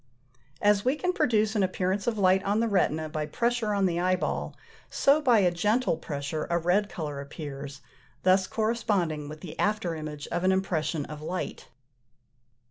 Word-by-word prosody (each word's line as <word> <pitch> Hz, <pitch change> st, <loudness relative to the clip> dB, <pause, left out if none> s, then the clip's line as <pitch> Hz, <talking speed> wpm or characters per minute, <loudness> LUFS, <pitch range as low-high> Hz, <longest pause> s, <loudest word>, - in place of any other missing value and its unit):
As 205 Hz, -1 st, +4 dB
we 255 Hz, +3 st, +2 dB
can 360 Hz, +4 st, -1 dB
produce 220 Hz, -, +2 dB
an 210 Hz, -, +2 dB
appearance 190 Hz, +2 st, -1 dB
of 230 Hz, -2 st, 0 dB
light 190 Hz, -1 st, +4 dB
on 205 Hz, +2 st, +1 dB
the 230 Hz, -, +2 dB
retina 160 Hz, -6 st, +1 dB
by 155 Hz, -1 st, -3 dB
pressure 235 Hz, +4 st, 0 dB
on 200 Hz, -1 st, +2 dB
the 175 Hz, -2 st, 0 dB
eyeball, 185 Hz, +1 st, -1 dB, 0.3 s
so 285 Hz, +3 st, +3 dB
by 250 Hz, -6 st, +4 dB
a 180 Hz, -2 st, +3 dB
gentle 210 Hz, +5 st, +1 dB
pressure 145 Hz, 0 st, -4 dB
a 170 Hz, -, +2 dB
red 180 Hz, +5 st, +1 dB
colour 150 Hz, -4 st, -5 dB
appears, 140 Hz, -1 st, -8 dB, 0.4 s
thus 185 Hz, 0 st, +4 dB
corresponding 200 Hz, -9 st, -1 dB
with 155 Hz, 0 st, -9 dB
the 170 Hz, -, -9 dB
after 205 Hz, -5 st, 0 dB
image 155 Hz, -2 st, -6 dB
of 175 Hz, -, -2 dB
an 185 Hz, -, +4 dB
impression 170 Hz, -5 st, -1 dB
of 150 Hz, -1 st, -8 dB
light. 180 Hz, +4 st, -4 dB
185 Hz, 170 wpm, -27 LUFS, 155-210 Hz, 0.4 s, As